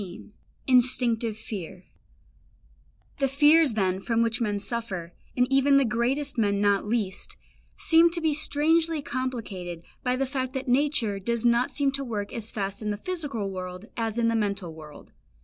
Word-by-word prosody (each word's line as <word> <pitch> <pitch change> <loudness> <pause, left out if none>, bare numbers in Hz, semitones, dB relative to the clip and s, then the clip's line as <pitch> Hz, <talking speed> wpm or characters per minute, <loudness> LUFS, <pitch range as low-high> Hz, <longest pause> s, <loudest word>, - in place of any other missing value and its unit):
XV 190 +2 -10 0.3
INSTINCTIVE 240 -3 +3
FEAR 185 -4 -7 1.4
The 275 - +2
fears 295 +1 +5
then 190 -3 0
from 230 +2 +1
which 230 +1 -1
men 210 -3 0
suffer, 200 -5 -3 0.2
and 250 - +4
even 275 +1 +5
the 275 - +4
greatest 250 +4 -1
men 200 -2 +2
not 205 0 +2
least, 210 -4 -2 0.4
seem 330 +1 +5
to 340 0 -2
be 320 -2 +1
strangely 315 +1 +1
complicated 215 -11 -4 0.2
by 250 0 +1
the 270 +1 0
fact 260 -1 -3
that 265 0 -4
nature 250 -6 +1
does 235 +4 -1
not 240 +1 +3
seem 280 -2 0
to 275 0 -2
work 210 -5 -4
as 225 -2 -2
fast 200 -1 -4
in 215 - -3
the 205 - -2
physical 275 - -3
world 185 +1 -6
as 225 -1 -2
in 235 -1 +2
the 230 - +1
mental 200 -6 -1
world. 155 -2 -13
235 Hz, 165 wpm, -26 LUFS, 205-275 Hz, 1.4 s, fears